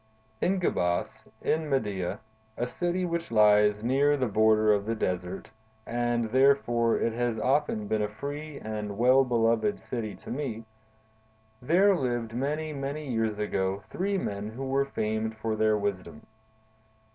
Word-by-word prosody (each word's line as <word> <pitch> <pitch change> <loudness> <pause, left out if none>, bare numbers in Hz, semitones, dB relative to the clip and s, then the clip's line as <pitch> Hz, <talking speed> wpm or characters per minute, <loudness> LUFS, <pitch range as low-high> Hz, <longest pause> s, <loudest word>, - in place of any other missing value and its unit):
"In 190 +1 +2
Gebas, 90 - -1 0.2
in 155 -1 0
Media, 105 -9 -1 0.4
a 120 - 0
city 175 +7 -1
which 170 -1 -3
lies 105 -1 +4
near 140 +4 +3
the 130 - 0
border 110 -1 +4
of 100 0 -1
the 115 - 0
desert—and, 110 +5 -3
therefore, 125 -3 +3
it 115 - 0
has 120 -1 -1
often 130 -3 +1
been 110 +1 0
a 105 - -1
free 145 +6 -6
and 105 -2 -5
well 130 +3 +5
beloved 120 - +1
city 110 -4 -5
to - - -10
me,—there 110 - -2
lived, 120 -6 -2
many, 150 +5 -2
many 140 0 -4
years 110 -2 0
ago, 100 -2 -1
three 195 +2 -1
men 105 - -3
who 125 +5 -6
were 135 +1 +1
famed 110 -3 -2
for 110 0 -2
their 110 0 +2
wisdom. 95 -6 -4
115 Hz, 140 wpm, -28 LUFS, 110-135 Hz, 0.4 s, well